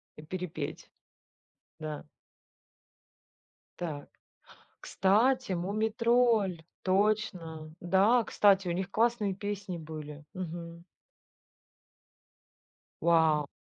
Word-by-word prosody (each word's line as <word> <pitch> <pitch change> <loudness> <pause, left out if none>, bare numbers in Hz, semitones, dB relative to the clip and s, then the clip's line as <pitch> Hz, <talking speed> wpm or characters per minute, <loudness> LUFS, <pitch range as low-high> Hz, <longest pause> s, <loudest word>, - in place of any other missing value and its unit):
И 150 - -11
перепеть. 180 +1 -5 0.9
Да. 155 -1 -5 1.8
Так, 155 -5 -5 0.7
кстати, 215 +5 +2
"Мумий 200 +5 -1
Тролль", 230 -6 +2 0.2
точно. 185 -6 0
Да, 200 +7 +4
кстати, 195 -3 +3
у - - 0
них 185 +2 -2
классные 220 -2 +1
песни 200 -2 -4
были. 155 -2 -8
Мгм. 170 -2 -6 2.2
Вау. 160 -3 +3
185 Hz, 75 wpm, -30 LUFS, 160-210 Hz, 2.2 s, Да